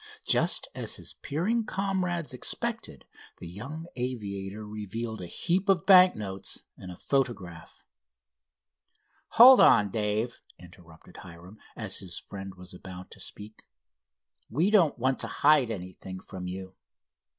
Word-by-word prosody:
Just -, -, +3 dB
as -, -, -1 dB
his -, -, -8 dB
peering 205 Hz, +11 st, -1 dB
comrades 185 Hz, -6 st, -2 dB
expected, 125 Hz, -, -3 dB, 0.3 s
the -, -, -10 dB
young 130 Hz, -, -8 dB
aviator 105 Hz, -5 st, -5 dB
revealed 110 Hz, +1 st, -6 dB
a 90 Hz, -, -6 dB
heap 180 Hz, -, -1 dB
of 190 Hz, -1 st, +3 dB
bank 185 Hz, -1 st, +7 dB
notes 95 Hz, -2 st, -4 dB
and 90 Hz, -, -10 dB
a -, -, -9 dB
photograph. 100 Hz, -11 st, -3 dB, 1.5 s
"Hold 255 Hz, +3 st, +10 dB
on, 105 Hz, -2 st, +6 dB
Dave," 110 Hz, +3 st, -2 dB, 0.2 s
interrupted 85 Hz, -2 st, -16 dB
Hiram, 90 Hz, +5 st, -13 dB, 0.2 s
as 110 Hz, -4 st, -2 dB
his 90 Hz, -4 st, -5 dB
friend 95 Hz, -1 st, -9 dB
was 90 Hz, 0 st, -11 dB
about 90 Hz, 0 st, -10 dB
to -, -, -10 dB
speak; 105 Hz, +1 st, -9 dB, 0.8 s
"we 165 Hz, -, +1 dB
don't 180 Hz, -9 st, +4 dB
want 130 Hz, +2 st, 0 dB
to -, -, -1 dB
hide 145 Hz, -4 st, +3 dB
anything 95 Hz, -2 st, -7 dB
from 95 Hz, -1 st, -8 dB
you. 95 Hz, +1 st, -7 dB
110 Hz, 130 wpm, -28 LUFS, 95-155 Hz, 1.5 s, Hold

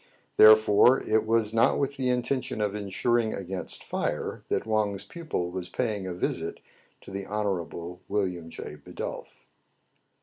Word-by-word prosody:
Therefore 110 Hz, +4 st, +7 dB
it 110 Hz, 0 st, +1 dB
was 110 Hz, -1 st, +2 dB
not 115 Hz, -, +4 dB
with 140 Hz, 0 st, -1 dB
the 130 Hz, -2 st, -1 dB
intention 125 Hz, 0 st, -1 dB
of 105 Hz, -2 st, 0 dB
insuring 110 Hz, +3 st, 0 dB
against 95 Hz, -1 st, -3 dB
fire -, -, -3 dB
that -, -, -1 dB
Wang's 105 Hz, -3 st, 0 dB
pupil 155 Hz, -, -4 dB
was 90 Hz, 0 st, -5 dB
paying 105 Hz, -6 st, -2 dB
a 90 Hz, -, -3 dB
visit 85 Hz, -2 st, -2 dB, 0.4 s
to -, -, -12 dB
the 100 Hz, 0 st, -5 dB
Honorable 90 Hz, -4 st, -3 dB
William 90 Hz, -5 st, -2 dB
J. -, -, -8 dB
Bidulph. -, -, -8 dB
105 Hz, 140 wpm, -27 LUFS, 95-115 Hz, 0.4 s, Therefore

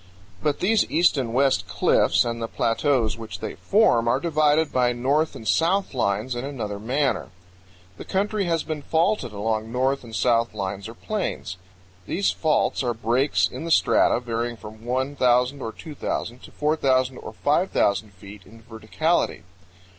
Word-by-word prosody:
But 145 Hz, -1 st, -1 dB
these 215 Hz, +3 st, +2 dB
east 170 Hz, +2 st, +3 dB
and 130 Hz, -5 st, -2 dB
west 130 Hz, -7 st, +2 dB
cliffs 95 Hz, +2 st, +2 dB
and 115 Hz, 0 st, -3 dB
the 115 Hz, -, -2 dB
plateaus 115 Hz, -1 st, 0 dB
which 110 Hz, -1 st, -7 dB
they -, -, -5 dB
form 195 Hz, -, +2 dB
are 120 Hz, -, +2 dB
divided 155 Hz, -1 st, +2 dB
by 125 Hz, -1 st, +2 dB
north 140 Hz, +6 st, 0 dB
and 110 Hz, -, -8 dB
south 190 Hz, +3 st, +1 dB
lines 110 Hz, 0 st, -1 dB
in 120 Hz, +1 st, -4 dB
another 115 Hz, -8 st, -5 dB
manner. 130 Hz, +1 st, -1 dB, 0.7 s
The -, -, -8 dB
country 200 Hz, +1 st, -1 dB
has 165 Hz, -2 st, 0 dB
been 155 Hz, -2 st, -4 dB
faulted 160 Hz, -, 0 dB
along 110 Hz, +2 st, -2 dB
north 130 Hz, +2 st, 0 dB
and 115 Hz, -2 st, -9 dB
south 115 Hz, -2 st, +1 dB
lines 100 Hz, 0 st, -4 dB
or 115 Hz, -, -10 dB
planes. 195 Hz, -, -4 dB, 0.5 s
These 195 Hz, +4 st, +1 dB
faults 155 Hz, -2 st, +1 dB
are 120 Hz, -3 st, -1 dB
breaks 120 Hz, +5 st, +1 dB
in -, -, -8 dB
the 165 Hz, -, -4 dB
strata 160 Hz, -, +4 dB
varying 120 Hz, -1 st, -3 dB
from 110 Hz, +1 st, -12 dB
1,000 130 Hz, 0 st, +1 dB
or 115 Hz, -, -4 dB
2,000 125 Hz, -4 st, -5 dB
to -, -, -13 dB
4,000 130 Hz, -4 st, +1 dB
or -, -, -8 dB
5,000 110 Hz, -, +1 dB
feet 100 Hz, +2 st, -12 dB
in 115 Hz, +3 st, -17 dB
verticality. 120 Hz, +9 st, -1 dB
125 Hz, 160 wpm, -24 LUFS, 115-150 Hz, 0.7 s, strata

